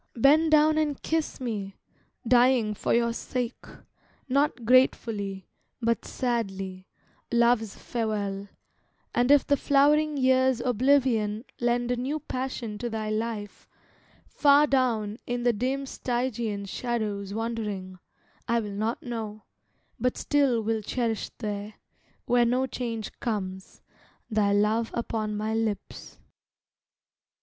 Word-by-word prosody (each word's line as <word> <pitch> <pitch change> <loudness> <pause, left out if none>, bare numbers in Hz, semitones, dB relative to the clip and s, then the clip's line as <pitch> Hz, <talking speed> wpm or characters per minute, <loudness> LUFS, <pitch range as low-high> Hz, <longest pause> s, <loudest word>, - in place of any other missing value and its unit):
Bend 295 +7 +5
down 310 0 +5
and 295 -3 -1
kiss 320 -1 -1
me, 210 -6 -4 0.5
dying 245 -3 +4
for - - -2
your 235 0 +2
sake, 245 0 -4 0.7
Not 275 -2 +1
gratefully, 215 -6 +2 0.3
but 230 -1 0
sadly, 195 -7 -3 0.4
love's 235 -3 +2
farewell; 205 -4 -3 0.7
And 245 +1 +2
if 285 -1 +6
the 285 - +2
flowering 295 +2 +3
year's 260 -1 +3
oblivion 245 -3 +2
Lend 240 0 +1
a 245 - 0
new 275 +5 -2
passion 255 -6 -4
to 240 - -3
thy 215 -1 -3
life, 215 -1 -4 0.6
far 285 0 +5
down 235 -6 0
In 245 0 -2
the 240 -1 +3
dim 260 +5 -1
Stygian 240 -6 -2
shadows 210 -2 -3
wandering, 210 -5 -4 0.5
I 235 0 +2
will 210 -2 -4
not 215 +3 -2
know, 220 -3 -5 0.6
but 250 +2 0
still 270 -6 +2
will 220 0 0
cherish 225 0 -2
there, 210 -1 -5 0.5
Where 245 0 +3
no 250 +2 +2
change 230 -4 -4
comes, 190 -4 -4 0.5
thy 210 -2 +2
love 215 +3 +2
upon 215 -3 -2
my 215 +1 -2
lips. 220 -2 -3
235 Hz, 120 wpm, -27 LUFS, 210-255 Hz, 0.7 s, if